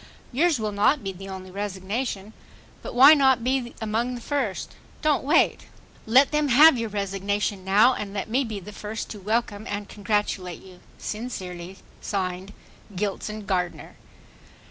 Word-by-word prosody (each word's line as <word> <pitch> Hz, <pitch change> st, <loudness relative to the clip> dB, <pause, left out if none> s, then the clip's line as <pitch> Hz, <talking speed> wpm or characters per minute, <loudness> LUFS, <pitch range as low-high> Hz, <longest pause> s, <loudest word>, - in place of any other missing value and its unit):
Yours 315 Hz, +4 st, +2 dB
will 215 Hz, -1 st, -2 dB
not 210 Hz, +7 st, +2 dB
be 195 Hz, -, -3 dB
the 195 Hz, +2 st, -10 dB
only 185 Hz, -1 st, -8 dB
resignation. 200 Hz, +2 st, -4 dB, 0.5 s
But -, -, -7 dB
why 270 Hz, +5 st, +9 dB
not 265 Hz, -5 st, +4 dB
be 255 Hz, -1 st, -1 dB
among 230 Hz, +3 st, -1 dB
the 240 Hz, -, -8 dB
first? 255 Hz, -8 st, -2 dB, 0.3 s
Don't 305 Hz, -2 st, +2 dB
wait. 300 Hz, +5 st, +2 dB, 0.4 s
Let 260 Hz, +5 st, +5 dB
them 300 Hz, -1 st, +1 dB
have 290 Hz, +4 st, +7 dB
your 230 Hz, -2 st, -2 dB
resignation. 200 Hz, 0 st, -2 dB
now 210 Hz, +7 st, +5 dB
and 205 Hz, -4 st, -5 dB
let 200 Hz, -1 st, -4 dB
me 250 Hz, +5 st, +1 dB
be 220 Hz, -4 st, -5 dB
the 210 Hz, +3 st, -11 dB
first 210 Hz, +2 st, -6 dB
to 210 Hz, -, -7 dB
welcome 215 Hz, +1 st, -2 dB
and 205 Hz, 0 st, -4 dB
congratulate 205 Hz, -4 st, -2 dB
you. 185 Hz, -1 st, -14 dB, 0.2 s
Sincerely, 190 Hz, -5 st, -6 dB, 0.2 s
(Signed) 185 Hz, -1 st, -3 dB, 0.4 s
GILSON 210 Hz, +2 st, -3 dB
GARDNER. 180 Hz, -3 st, -2 dB
210 Hz, 150 wpm, -25 LUFS, 195-245 Hz, 0.5 s, why